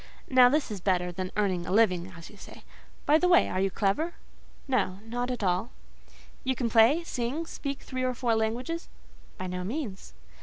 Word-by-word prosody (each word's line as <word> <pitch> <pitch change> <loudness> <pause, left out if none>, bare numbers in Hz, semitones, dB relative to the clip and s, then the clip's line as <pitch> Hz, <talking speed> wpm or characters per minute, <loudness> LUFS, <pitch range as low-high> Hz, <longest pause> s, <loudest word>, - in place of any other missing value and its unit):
Now, 255 -2 +7
this 290 -3 0
is 200 -3 -5
better 180 -1 +1
than 185 +1 -5
'earning 185 -4 0
a - - -3
living,' 190 -4 +2
as 165 - -11
you - - -15
say. 200 - -13 0.4
By 305 +2 +5
the 360 - +2
way, 355 -1 +5
are 185 - -2
you 195 - +2
clever?" 210 - 0 0.5
"No—not 240 0 -1
at 245 -4 -3
all." 185 +5 0 0.7
"You 260 0 0
can 235 -2 -2
play, 235 +9 +5
sing, 270 +2 -3
speak 280 -3 -5
three 255 -1 -4
or 255 -1 0
four 240 -2 +1
languages?" 240 +10 -2 0.5
"By 185 - -5
no 180 0 -4
means." 215 -2 -5
225 Hz, 185 wpm, -28 LUFS, 190-260 Hz, 0.7 s, Now